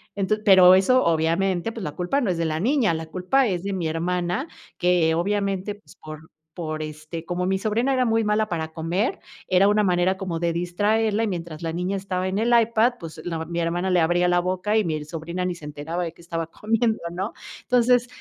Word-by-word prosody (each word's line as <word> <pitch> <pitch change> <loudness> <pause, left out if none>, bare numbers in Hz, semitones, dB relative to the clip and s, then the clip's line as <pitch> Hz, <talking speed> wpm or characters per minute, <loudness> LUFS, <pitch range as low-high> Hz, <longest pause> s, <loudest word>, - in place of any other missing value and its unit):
Enton 205 +2 0
pero 185 -2 +8
eso, 255 +7 +4
obviamente, 170 +5 +1
pues, 225 - -7
la 150 - -3
culpa 180 +11 0
no 220 - 0
es 175 - 0
de 165 - 0
la 155 +1 -1
niña, 240 - +2
la 160 0 -4
culpa 205 +10 +1
es 180 -2 -2
de 200 0 -3
mi 175 -4 -2
hermana, 180 - -1 0.3
que, 175 -2 +2
obviamente, 200 +2 -1
pues, 205 - -20
por 155 +1 -11 0.3
por, 155 -2 -4
este 155 +2 -7
como 180 +1 -2
mi 190 +1 +1
sobrina 230 +6 0
era 255 -1 +2
muy 225 0 +2
mala 210 +1 +1
para 160 -4 -3
comer, 175 - -1 0.3
era 185 +2 +5
una 210 0 +3
manera 180 0 +2
como 185 -4 -4
de 170 -1 0
distraerla. 205 +5 0
Y - - -2
mientras 170 -3 -5
la 165 -1 -3
niña 180 +3 -2
estaba 185 -1 -2
en 195 - -2
el 235 +2 +2
iPad, 230 +1 +3
pues, 165 -4 -9
la 165 -2 -3
ma 160 - -4
mi 170 +1 -4
hermana 175 +3 -1
le 180 -1 +3
abría 175 +2 +2
la 175 0 +3
boca, 185 +4 0
y 215 - +2
mi 155 -2 -2
sobrina 165 +4 -5
ni 180 - -1
se 155 - -12
enteraba 150 +4 -4
de 165 - -6
que 170 - -18
estaba 165 -1 -4
comiendo, 225 +5 0
¿no? 190 +5 -4 0.3
Entonces, 245 0 +3
180 Hz, 220 wpm, -24 LUFS, 165-210 Hz, 0.3 s, pero